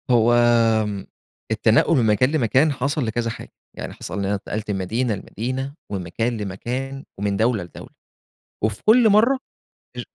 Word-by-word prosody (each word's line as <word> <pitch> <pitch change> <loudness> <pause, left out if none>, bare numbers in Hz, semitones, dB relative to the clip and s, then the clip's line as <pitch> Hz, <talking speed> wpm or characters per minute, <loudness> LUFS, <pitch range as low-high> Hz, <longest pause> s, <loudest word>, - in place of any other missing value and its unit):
هو 120 -1 +4 0.5
آمم، 100 -2 -4 0.5
التنقّل 165 - +3
من 120 - +3
مكان 110 +5 +3
لمكان 140 +1 +3
حصل 140 +1 -1
لكذا 115 +1 -1
حاجة، - - -8 0.3
يعني - - -6
حصل 90 +3 -6
إن 100 - -1
أنا 100 +1 0
اتنقلت 105 +1 -4
من 100 - -1
مدينة 110 +6 -1
لمدينة، 130 +7 -4 0.2
ومن 95 -3 -3
مكان 115 +8 -2
لمكان، 125 +7 -4 0.2
ومن 100 -1 -1
دولة 110 -3 +1
لدولة، 85 - -11 0.7
وفي - - -1
كُلّ 225 +1 +6
مَرّة 230 +6 +4 0.6
ار - - -3
115 Hz, 160 wpm, -22 LUFS, 105-135 Hz, 0.7 s, كُلّ